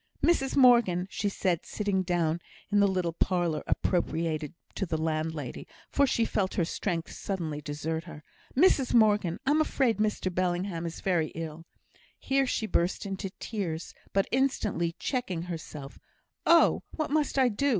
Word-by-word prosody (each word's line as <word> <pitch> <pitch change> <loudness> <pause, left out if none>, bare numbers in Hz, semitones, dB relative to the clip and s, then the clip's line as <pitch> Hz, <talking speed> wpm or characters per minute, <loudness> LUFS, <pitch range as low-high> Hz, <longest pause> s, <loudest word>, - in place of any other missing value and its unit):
"Mrs 270 -6 +2
Morgan," 235 -9 +5
said 190 -4 0
she, - - -13
sitting 200 -3 +1
down 170 -3 0 0.3
in 205 - +4
the 200 - +5
little 185 -3 0
parlour 175 -3 0
appropriated 165 -3 0 0.2
to 195 - -2
the 160 - -1
landlady, 155 -3 -3 0.2
for 280 0 +3
she 230 -3 +2
felt 195 -3 -1
her 170 - +2
strength 170 -1 -3
suddenly 160 -7 -4
desert 155 +3 -3
her 155 -3 -10 0.3
"Mrs 275 -6 +4
Morgan, 210 -6 +4
I'm 295 +3 +4
afraid 265 -6 +1
Mr 210 -3 0
Bellingham 175 -1 -1
is 165 - -7
very 175 -5 +1
ill;" 165 0 -6 0.5
here 270 0 +1
she 220 - -1
burst 180 -3 0
into 195 -1 -4
tears, 175 -7 -4 0.2
but 195 0 +2
instantly 230 -10 0
checking 215 -11 -2
herself, 160 -5 -7 0.5
"Oh, 335 0 +6
what 310 -2 -2
must 300 -2 +1
I 260 -2 +5
do?" 280 +6 0
185 Hz, 150 wpm, -29 LUFS, 165-225 Hz, 0.5 s, Oh